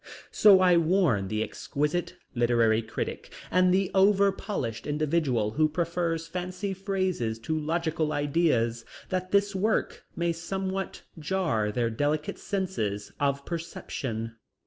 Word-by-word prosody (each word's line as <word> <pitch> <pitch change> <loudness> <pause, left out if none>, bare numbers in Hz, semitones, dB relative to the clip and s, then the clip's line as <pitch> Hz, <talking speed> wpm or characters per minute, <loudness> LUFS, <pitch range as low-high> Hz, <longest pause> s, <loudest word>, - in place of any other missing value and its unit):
So 200 -3 +7
I 180 -2 +5
warn 165 - +2
the 110 +2 -1
exquisite 150 +10 -2 0.2
literary 115 -2 +3
critic 110 -1 -5 0.2
and 185 0 +4
the 190 0 +2
over 195 +1 +5
polished 135 - -4
individual 145 -7 +1
who 155 +6 +2
prefer 170 +1 -1
fancy 180 +4 -4
phrases 185 - -1
to 155 +8 -2
logical 160 0 -1
ideas, 145 -6 +1 0.3
that 185 0 -2
this 200 +1 +2
work 215 +4 0
may 170 0 0
somewhat 190 +3 -4 0.2
jar 150 - 0
their 115 +1 0
delicate 145 +5 -1
senses 140 - -3
of 140 -1 0
perception. 130 -9 -4
165 Hz, 125 wpm, -27 LUFS, 120-185 Hz, 0.3 s, So